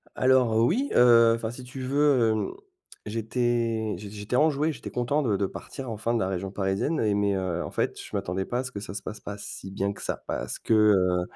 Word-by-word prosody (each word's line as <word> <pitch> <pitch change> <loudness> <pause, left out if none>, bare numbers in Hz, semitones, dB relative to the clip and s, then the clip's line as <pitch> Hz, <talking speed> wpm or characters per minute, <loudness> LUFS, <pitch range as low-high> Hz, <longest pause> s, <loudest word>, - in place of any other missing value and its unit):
Alors, 130 -4 +3
oui, 195 - +2
heu, 115 -2 +7
enfin, 115 -1 -4
si 125 +1 -9
tu 130 +1 -8
veux, 135 -3 +3
hem, 110 - -1 0.5
j'étais 115 0 -1
j'é 100 +2 -8
j'étais 105 +3 -4
enjoué, 150 +2 +3
j'étais - - -8
content 125 +5 0
de 110 -8 +1
de 100 - 0
partir 130 +6 -7
enfin 115 +2 -2
de 120 - +1
la 95 - 0
région 95 0 -3
parisienne, 100 +11 -1
et 105 -2 +2
mais, 100 0 +1
heu, 90 -2 -2
en - - -6
fait, - - -1
je - - -10
m'attendais 95 +2 -2
pas 125 - -2
à - - -1
ce 125 - -6
que 100 -4 -6
ça 105 - -7
se 110 - -5
passe 105 - -7
pas 100 0 -6
si 95 -1 -8
bien 100 +1 -1
que - - -12
ça. - - -3
Parce - - -3
que, 115 - 0
heu, 95 -4 +4
110 Hz, 230 wpm, -26 LUFS, 100-125 Hz, 0.5 s, heu